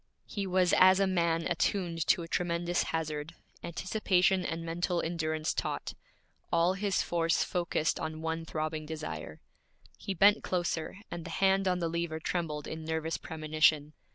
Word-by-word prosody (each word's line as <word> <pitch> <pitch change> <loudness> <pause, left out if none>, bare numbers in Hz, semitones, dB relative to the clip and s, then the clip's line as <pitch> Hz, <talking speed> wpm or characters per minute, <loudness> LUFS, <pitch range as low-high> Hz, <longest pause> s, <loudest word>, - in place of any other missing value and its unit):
He 200 -2 -4
was 185 -1 +2
as 185 +1 +7
a 195 - +4
man 170 -3 +1
attuned 170 -1 0
to 175 - +3
a - - -7
tremendous 175 0 0
hazard, 155 0 -3 0.3
anticipation 185 +1 +1
and 165 -1 -3
mental 175 +1 -1
endurance 155 -2 -1
taut, - - -3 0.6
all 170 +2 +3
his 195 0 0
force 165 -1 +1
focused 170 -3 0
on 160 0 -4
one 165 0 -2
throbbing 155 -1 -3
desire. 80 - -6 0.6
He 195 - -4
bent 205 +4 +5
closer, 175 -1 -2
and 170 -1 -5
the - - -7
hand 195 0 +2
on 180 -1 +2
the 170 -2 -1
lever 165 -1 -2
trembled 160 -3 -2
in 160 0 -6
nervous 160 0 -2
premonition. 155 -1 +1
165 Hz, 155 wpm, -31 LUFS, 160-180 Hz, 0.6 s, as